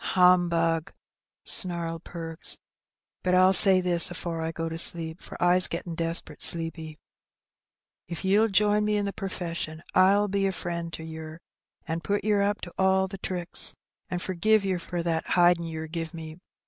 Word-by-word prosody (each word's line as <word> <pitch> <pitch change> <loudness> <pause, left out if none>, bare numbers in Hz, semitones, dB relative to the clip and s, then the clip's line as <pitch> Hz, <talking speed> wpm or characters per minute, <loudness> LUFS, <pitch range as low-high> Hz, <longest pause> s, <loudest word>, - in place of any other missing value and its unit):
Humbug!'' 170 -3 +2 0.5
snarled 170 -3 0
Perks. 165 -2 -3 0.6
"But 180 0 0
I'll 185 +1 +4
say 190 0 +8
this 175 -2 +3
afore 170 -1 -5
I 160 0 -3
go 165 0 -5
to 165 - -6
sleep, 165 -1 +2
for - - -11
I's 180 +1 +3
gettin' 170 0 -5
degpert 165 +1 -2
sleepy, 165 -2 +1 1.1
if 170 +2 -6
ye'll 205 +4 +3
join 210 +1 +1
me 210 0 0
in 205 - -1
the 200 - -4
perfession 170 -4 -6
I'll 200 +3 +3
be 195 0 -1
a - - -1
frion' 170 -2 -5
to 160 - -7
yer, 160 0 -9 0.5
an' 165 +1 -3
put 200 +6 -2
yer 210 -1 +1
up 205 +1 -1
to 175 - -9
all 190 0 +2
the 195 0 -9
tricks, 180 -2 +1 0.3
an' 180 - -3
forgive 195 +4 0
yer 185 -2 -1
for 175 0 -5
that 165 -1 -2
hidin' 175 -1 +3
yer 160 -1 -6
give 165 +1 -6
me. 160 0 -9
175 Hz, 170 wpm, -26 LUFS, 165-190 Hz, 1.1 s, say